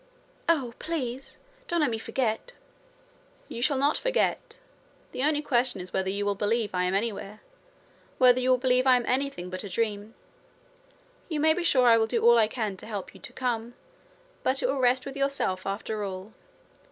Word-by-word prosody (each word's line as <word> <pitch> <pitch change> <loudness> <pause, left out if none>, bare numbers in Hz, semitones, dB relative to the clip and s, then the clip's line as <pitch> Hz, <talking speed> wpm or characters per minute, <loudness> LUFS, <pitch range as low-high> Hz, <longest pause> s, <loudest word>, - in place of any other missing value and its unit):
'Oh! 270 -8 +2
please, 270 -5 -4 0.3
don't 345 -1 0
let 290 -5 +2
me 225 - -2
forget.' 240 - -2 0.9
'You 235 - -6
shall 280 +2 +2
not 285 +3 +2
forget. - - -1 0.5
The - - -4
only 300 0 +1
question 245 -5 +1
is 180 0 -8
whether 190 0 0
you 200 +1 -2
will 205 - +1
believe 210 +1 -1
I 180 0 +1
am 180 +1 0
anywhere 210 0 -3 0.8
whether 250 -1 +6
you 255 0 0
will 255 - +5
believe 255 +1 +2
I 255 - +7
am 245 -1 0
anything 255 -9 -1
but 185 0 -5
a 200 - -6
dream. 210 +2 -2 1.1
You 310 -3 -2
may 315 +1 +4
be 355 +2 -2
sure 260 -7 +4
I 230 -1 +6
will 220 - +2
do 230 0 -1
all 235 0 +7
I 220 - +4
can 215 -4 -3
to - - -11
help 205 -4 -6
you - - -15
to - - -9
come. 240 -2 -3 0.7
But 265 +1 0
it - - +3
will 270 +1 -1
rest 255 0 +3
with 275 0 -7
yourself, 275 -10 -1
after 210 +2 -3
all. 190 +2 -6
240 Hz, 190 wpm, -27 LUFS, 210-270 Hz, 1.1 s, I